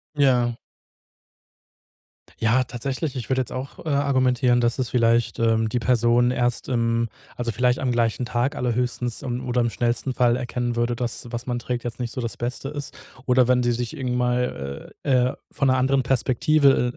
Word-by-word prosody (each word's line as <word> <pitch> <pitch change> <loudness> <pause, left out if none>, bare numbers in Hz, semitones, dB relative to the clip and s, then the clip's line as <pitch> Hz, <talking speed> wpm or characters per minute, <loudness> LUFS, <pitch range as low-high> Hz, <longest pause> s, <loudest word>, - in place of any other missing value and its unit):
Ja. 125 -4 +3 1.8
Ja, 115 +3 +3
tatsächlich, 130 +4 -4
ich 120 -2 -5
würde 130 0 +2
jetzt 120 - -5
auch, 130 +2 -6
äh, - - -2
argumentieren, 130 -3 +2
dass 120 +2 +1
es 125 - -1
vielleicht, 115 -1 +2
ähm, 115 -1 +2
die 120 - -1
Person 120 0 +3
erst 120 0 -1
im 115 -1 +1 0.3
also, 120 -1 -2
vielleicht 125 +2 +1
am 130 -2 0
gleichen 120 +1 0
Tag 125 +4 -1
allerhöchstens, 125 0 -2
ähm, 125 0 -4
oder 125 0 +1
im 120 - +1
schnellsten 120 +3 -1
Fall 120 -2 +3
erkennen 120 -1 -2
würde, 120 0 0
dass, 120 0 -4
was 120 +1 -4
man 120 -1 -1
trägt, 120 0 -3
jetzt 120 0 -5
nicht 120 -1 -3
so 130 - -3
das 115 - -4
Beste 125 +3 -4
ist. 145 -2 -6 0.3
Oder 125 -1 +4
wenn 125 -1 +3
sie 120 - +2
sich 120 +5 -3
irgend 125 -3 -2
mal, 125 - -2
äh, 130 -2 +2 0.2
von 140 -2 +1
'ner 130 - +3
anderen 130 +1 +2
Perspektive, 130 0 +3
125 Hz, 180 wpm, -23 LUFS, 120-130 Hz, 1.8 s, Oder